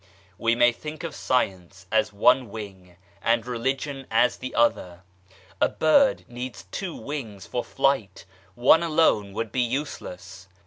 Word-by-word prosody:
We 115 0 +2
may 120 0 +5
think 150 +7 -8
of 165 -2 -4
Science 95 -7 -2
as 110 -1 +2
one 125 +4 +3
wing 95 -4 -9 0.3
and 115 0 +1
Religion 135 +3 -3
as 115 +2 +3
the 130 - -7
other; 90 -6 +1 0.6
a - - +4
bird 265 - +3
needs 125 +1 -7
two 190 -4 -4
wings 115 -10 -6
for 120 - -3
flight, 135 -6 0 0.3
one 125 +7 +5
alone 155 -11 +2
would 110 0 -3
be 125 - 0
useless. 115 -8 -5
120 Hz, 140 wpm, -25 LUFS, 105-135 Hz, 0.6 s, may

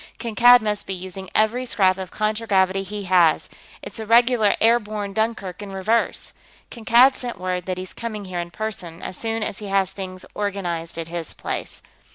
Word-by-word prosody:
Kankad 240 +1 +6
must 210 -1 -2
be 190 - -2
using 185 +1 -8
every 220 +4 +2
scrap 190 -6 +2
of 185 -2 -5
contragravity 205 -3 +1
he 205 +2 -6
has; 175 -4 +3 0.4
it's - - -8
a 220 - -4
regular 235 -2 +4
airborne 215 -3 +1
Dunkirk 215 -4 -2
in 200 -1 -7
reverse. 215 +5 0 0.4
Kankad 240 +3 +5
sent 245 -2 -5
word 180 -1 -3
that 185 -1 -2
he's 185 0 -7
coming 215 -3 -5
here 180 -2 -4
in 175 0 -4
person, 180 -5 -5
as - - -5
soon 225 +2 -2
as 210 - -4
he 210 - -7
has 195 -1 +1
things 185 -1 -8
organized 175 -5 -3
at 165 -1 -4
his 170 -2 -5
place. - - -5
200 Hz, 180 wpm, -22 LUFS, 185-225 Hz, 0.4 s, Kankad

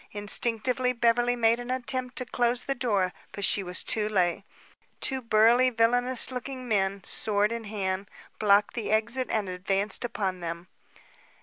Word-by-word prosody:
Instinctively, 235 +4 +2
Beverly 240 +1 +2
made 230 0 +2
an 245 0 -7
attempt 255 0 -2
to 255 - -3
close 245 0 0
the 275 - -1
door; 205 -8 0 0.2
but 200 - -1
she 200 - +1
was 180 -1 -4
too 215 -1 0
late. 185 -2 +1 0.6
Two 265 -1 +1
burly, 230 +2 +4
villainous 245 +2 +1
looking 255 0 -6
men, 195 -3 0
sword 210 +2 +2
in 230 -1 -5
hand, 195 -2 -3 0.3
blocked 205 -1 +3
the 230 -4 -4
exit 235 +4 0
and 215 -3 -1
advanced 195 +4 -2
upon 195 -6 -3
them. 170 0 -6
225 Hz, 150 wpm, -27 LUFS, 200-245 Hz, 0.6 s, burly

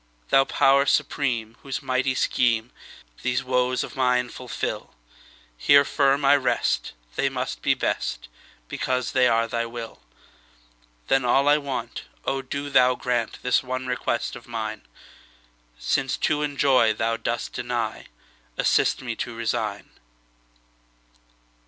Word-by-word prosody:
Thou 135 - +5
Power 140 +1 +3
Supreme, 115 -7 0
whose 135 -2 -5
mighty 130 0 0
schemeThese 120 - -1
woes 125 0 +1
of - - -8
mine 125 -2 +2
fulfil, 125 - -5 0.6
Here 140 - +5
firm 140 0 +2
I 140 +1 +6
rest; 135 - 0 0.2
they - - +1
must - - -4
be - - +2
best, - - -2 0.4
Because 130 - -2
they 130 -1 +4
are 115 0 +2
Thy 115 0 -2
will! 115 -1 -8 1.1
Then 135 0 +3
all 135 +3 +3
I 145 +1 +5
want—O 135 0 -4
do 140 +2 -5
Thou 125 -1 +5
grantThis 125 0 0
one 130 0 -4
request 125 -2 -2
of - - -12
mine!—Since - - -5
to 150 -1 +1
enjoy 140 -6 +3
Thou 115 +1 -1
dost 120 +1 -3
deny, 120 -3 -3 0.5
Assist - - +2
me - - -3
to 120 - -4
resign. 115 -1 -3
125 Hz, 120 wpm, -24 LUFS, 115-135 Hz, 1.1 s, I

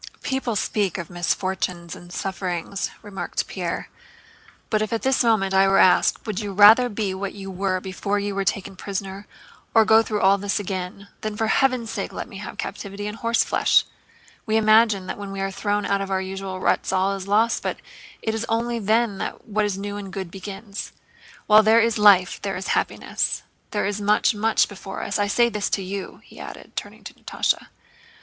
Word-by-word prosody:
"People 265 -4 -1
speak 200 -3 0
of 170 -2 -6
misfortunes 175 -1 -2
and 175 0 -13
sufferings," 190 0 -3
remarked 205 -2 -3
Pierre, - - -4 0.8
"but 215 -1 +2
if 215 - -2
at 230 - -2
this 265 -1 +3
moment 215 -5 +2
I 195 0 +5
were 195 0 +4
asked: 185 - +4
'Would 215 -4 -3
you 205 -2 -4
rather 215 +5 +7
be 205 -3 -2
what 195 +1 -4
you 195 -1 -7
were 190 0 -1
before 195 +2 -2
you 205 0 -2
were 195 0 -1
taken 195 0 -2
prisoner, 195 +1 -5 0.5
or 220 -1 +7
go 220 +1 +6
through 215 -2 -2
all 195 +1 +5
this 200 +1 -1
again?' 190 0 -5
then 215 -1 -4
for 225 - +1
heaven's 250 -1 +1
sake - - -4
let - - -6
me - - -10
again - - -7
have - - -9
captivity 200 0 -5
and 210 +1 -5
horseflesh! 230 0 +3 0.6
We 220 0 +2
imagine 215 -2 +4
that 185 - -5
when 200 -1 -6
we 195 - -5
are 195 0 -1
thrown 205 +1 -1
out 200 0 +1
of 195 - -4
our 190 -1 +1
usual 190 0 -5
ruts - - +1
all 190 +1 +2
is 195 0 -7
lost, 220 +3 +2
but - - -3 0.5
it 220 - 0
is 225 0 -2
only 235 +1 0
then 220 -1 +1
that - - -5
what 215 0 0
is 200 -2 -2
new 205 +1 -5
and 195 -2 -7
good 190 -3 -5
begins. 200 +2 -7 0.5
While 215 0 +7
there 220 +1 +5
is 230 -1 +2
life 195 -4 +5
there 195 -2 -3
is 190 - -5
happiness. - - -1 0.3
There 205 - -1
is 205 +1 -2
much, 210 +3 +3
much 220 +1 +2
before 195 -1 -7
us. 200 - -2
I 205 - +2
say 235 +4 +3
this 210 -3 -2
to 195 - -1
you," 195 +1 -6
he - - -15
added, - - -10
turning - - -6
to - - -9
Natásha. - - -1
200 Hz, 200 wpm, -23 LUFS, 195-215 Hz, 0.8 s, rather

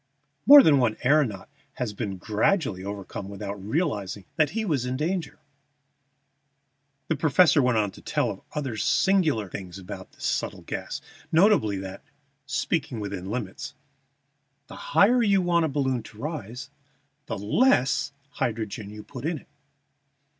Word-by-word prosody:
More 285 0 +11
than 145 -3 +5
one 115 -4 +2
aëronaut 130 -8 +2 0.3
has 120 -4 -3
been 100 -3 -4
gradually 105 - 0
overcome 100 0 -6
without 100 -1 -6
realizing 105 - -2
that 155 -3 +3
he 220 - 0
was 145 -10 0
in 125 +1 -2
danger." 165 0 -2 1.7
The 160 - +1
professor 155 +1 +4
went 125 -3 +2
on 105 -2 +1
to - - -14
tell - - 0
of - - -9
other 135 -7 -3
singular 160 - +2
things 90 0 -8
about 95 -2 -9
this - - -8
subtle - - -2
gas, - - -5 0.3
notably 165 - +4
that, 95 0 -7 0.4
speaking 140 -2 -1
within 100 -2 -5
limits, 105 -4 -5 0.9
the - - -11 0.2
higher 240 +5 +6
you 200 -3 +4
want 170 -2 +2
a - - -1
balloon 135 -3 0
to 105 - -14
rise, 135 -1 -6 0.6
the 110 - -3
less 140 - +2 0.2
hydrogen 110 -4 -3
you 105 0 -9
must - - -20
put 130 -3 -8
in 160 +1 -1
it. - - -15
125 Hz, 145 wpm, -26 LUFS, 105-160 Hz, 1.7 s, More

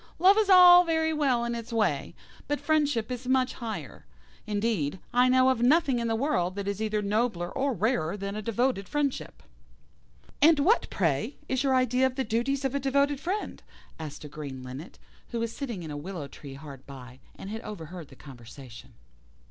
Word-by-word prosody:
Love 375 +4 +6
is 425 -2 +1
all 360 -1 +9
very 320 -1 0
well 265 -6 +1
in 235 - -2
its 235 0 -6
way, 205 -12 0 0.3
but 290 0 -1
friendship 290 -6 0
is 250 0 -5
much 260 0 +2
higher. 215 - -7 0.4
Indeed, 205 -7 -1 0.2
I 250 +1 +4
know 255 0 +5
of 255 -3 0
nothing 275 0 +3
in 235 - -1
the 225 - 0
world 225 - 0
that 200 -1 -4
is 200 +1 -3
either 215 -1 -1
nobler 200 -4 -1
or 275 +1 0
rarer 205 -5 0
than 200 0 -5
a 215 - -3
devoted 230 -2 -1
friendship." 290 -2 -2 1.0
"And 315 +2 +6
what, 360 +12 +2
pray, 165 - -1
is 260 0 0
your 265 -1 +2
idea 255 0 +3
of 260 - -6
the 265 - -1
duties 260 +5 -1
of 265 - -1
a 280 - 0
devoted 280 +1 +1
friend?" 380 +7 -4 0.4
asked 150 -2 -7
a - - -7
Green 140 -3 -8
Linnet, 130 +7 -9 0.3
who 235 - -3
was 230 0 -3
sitting 235 -11 -5
in 155 - -7
a 145 - -5
willow 160 -1 -6
tree 140 0 -11
hard 140 -2 -11
by, 130 -2 -11 0.2
and 195 - -8
had 220 +1 -5
overheard 175 -6 -8
the 135 - -15
conversation. 125 -1 -13
230 Hz, 190 wpm, -27 LUFS, 175-270 Hz, 1.0 s, all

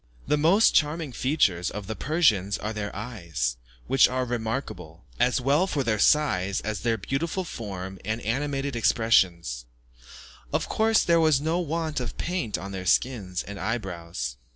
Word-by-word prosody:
The - - +2
most 170 +9 +4
charming 150 -1 +1
features 120 - +1
of 105 -1 -6
the 110 +2 -4
Persians 110 - +2
are 105 +1 -4
their 105 -1 -3
eyes, 85 - -3 0.3
which 135 - +5
are 130 0 -1
remarkable, 110 - -4
as 125 - +3
well 145 +8 +2
for 145 -7 -1
their 110 -4 0
size 100 -10 +3
as 110 -1 -3
their 115 +2 0
beautiful 160 - -2
form 95 - -6
and 110 +3 -2
animated 135 +3 -2
expression. 110 -6 +3 1.1
Of - - 0
course, 220 0 +3
there 170 -1 +3
was 155 -4 +4
no 160 +4 0
want 160 -2 -2
of 125 - -5
paint 175 - -2
on 95 +5 -7
their 95 -1 -5
skins 100 -6 +1
and 100 0 -8
eye 115 +5 0
brows. 85 - -6
115 Hz, 160 wpm, -26 LUFS, 95-145 Hz, 1.1 s, which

